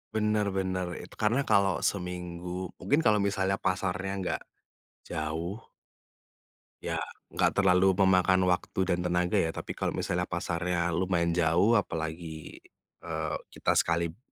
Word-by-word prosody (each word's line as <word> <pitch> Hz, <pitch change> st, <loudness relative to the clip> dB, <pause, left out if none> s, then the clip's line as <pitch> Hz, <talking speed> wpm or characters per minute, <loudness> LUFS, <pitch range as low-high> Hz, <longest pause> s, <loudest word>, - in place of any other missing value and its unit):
Bener 105 Hz, -1 st, +1 dB
bener, 95 Hz, -1 st, -1 dB
itu 90 Hz, -, -11 dB
karena 115 Hz, +5 st, +1 dB
kalau 100 Hz, -3 st, +3 dB
seminggu 90 Hz, -1 st, -3 dB
mungkin 145 Hz, +3 st, +1 dB
kalau 110 Hz, -8 st, +4 dB
misalnya 100 Hz, -1 st, +1 dB
pasarnya 95 Hz, 0 st, -1 dB
nggak 90 Hz, -, -2 dB, 0.6 s
jauh 80 Hz, +7 st, -3 dB, 1.2 s
ya, -, -, -2 dB, 0.3 s
enggak -, -, +1 dB
terlalu 95 Hz, 0 st, +5 dB
memakan 95 Hz, -1 st, +4 dB
waktu 90 Hz, +1 st, 0 dB
dan 90 Hz, 0 st, 0 dB
tenaga, 90 Hz, 0 st, +1 dB
ya, 80 Hz, 0 st, +1 dB
tapi -, -, -6 dB
kalau -, -, -1 dB
misalnya 90 Hz, 0 st, -1 dB
pasarnya 85 Hz, 0 st, -1 dB
lumayan 85 Hz, 0 st, +1 dB
jauh, 85 Hz, +6 st, +3 dB
apalagi, 80 Hz, -3 st, -4 dB, 0.5 s
eee, -, -, -2 dB, 0.2 s
kita -, -, +1 dB
sekali 85 Hz, +1 st, +1 dB
90 Hz, 125 wpm, -29 LUFS, 85-95 Hz, 1.2 s, terlalu